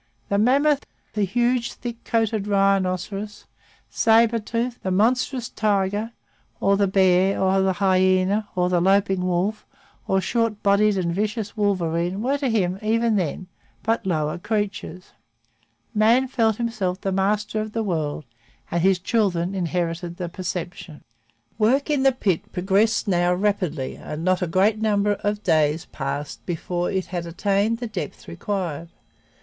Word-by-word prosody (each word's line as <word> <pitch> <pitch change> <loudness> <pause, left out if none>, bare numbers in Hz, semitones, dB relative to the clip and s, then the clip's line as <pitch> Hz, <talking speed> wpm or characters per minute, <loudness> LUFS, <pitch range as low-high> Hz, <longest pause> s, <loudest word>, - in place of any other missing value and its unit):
The 200 - +1
mammoth, 275 +5 +3 0.3
the 210 -2 +1
huge, 240 +4 0
thick 240 -1 -7
coated 220 -3 0
rhinoceros, 195 +1 0 0.4
sabre 230 +1 +3
tooth, 235 +3 -3
the 190 - -2
monstrous 240 +5 +1
tiger, 205 +1 -1 0.5
or 200 0 +3
the 200 0 +2
bear, 190 0 +3
or 190 0 +2
the 190 0 +2
hyena, 185 +2 +2
or 180 -1 +2
the 180 -1 +1
loping 195 0 +2
wolf, 185 +4 -1 0.4
or 190 - +2
short 230 +1 -1
bodied 200 0 +3
and 170 -2 -1
vicious 210 +2 -2
wolverine 180 -3 0
were 275 +3 0
to 275 -3 0
him, 190 -4 0
even 225 +1 +1
then, 185 -1 -2 0.4
but 225 +1 0
lower 155 -2 -1
creatures. 205 -3 -3 0.8
Man 230 +5 +4
felt 225 -4 +1
himself 215 -6 -2
the 195 - -1
master 210 +3 0
of 215 0 -6
the 225 - -1
world, 155 -6 -2 0.5
and 170 - 0
his 190 +1 +4
children 185 -2 0
inherited 175 -1 -2
the 175 -2 -4
perception. 175 -3 -6 0.6
Work 265 +8 +2
in 290 -2 +2
the 270 0 +5
pit 200 -9 -1
progressed 200 +5 +1
now 175 -1 +2
rapidly 180 -8 -1
and 150 +2 -6
not 185 0 +2
a 180 - 0
great 195 +6 +2
number 210 -1 +2
of 205 +1 -1
days 155 -1 +2
passed 140 +1 -5
before 175 0 -2
it 190 -2 -1
had 175 -2 -5
attained 200 +6 0
the 240 - -5
depth 220 - -6
required. 170 -3 -4
195 Hz, 145 wpm, -23 LUFS, 180-220 Hz, 0.8 s, the